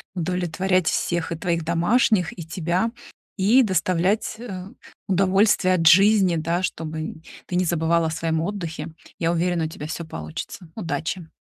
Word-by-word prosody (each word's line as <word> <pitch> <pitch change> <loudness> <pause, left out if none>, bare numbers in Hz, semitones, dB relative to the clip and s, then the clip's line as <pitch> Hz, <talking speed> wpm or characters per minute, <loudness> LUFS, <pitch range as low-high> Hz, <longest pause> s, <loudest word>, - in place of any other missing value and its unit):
удовлетворять 180 +1 0
всех: 170 -1 0
и - - -1
твоих 170 0 -1
домашних, 175 +3 +2
и 170 - -5
тебя, 175 +6 -1 0.5
и 220 +7 +5
доставлять, 185 +1 +1
э, 190 -6 -7 0.4
удовольствие 195 0 +3
от 165 -2 +2
жизни, 195 0 +6
да, 165 +3 -1
чтобы 160 -2 -4 0.3
ты 180 - -4
не 180 +1 +2
забывала 165 0 +1
о - - -3
своем 160 0 -1
отдыхе. 165 -4 -4 0.3
Я 165 -1 +1
уверена, 170 -1 0
у - - -4
тебя 150 -1 -7
всё 160 +1 -5
получится, 80 - -7
удачи. 165 -2 -3
175 Hz, 145 wpm, -23 LUFS, 165-190 Hz, 0.5 s, жизни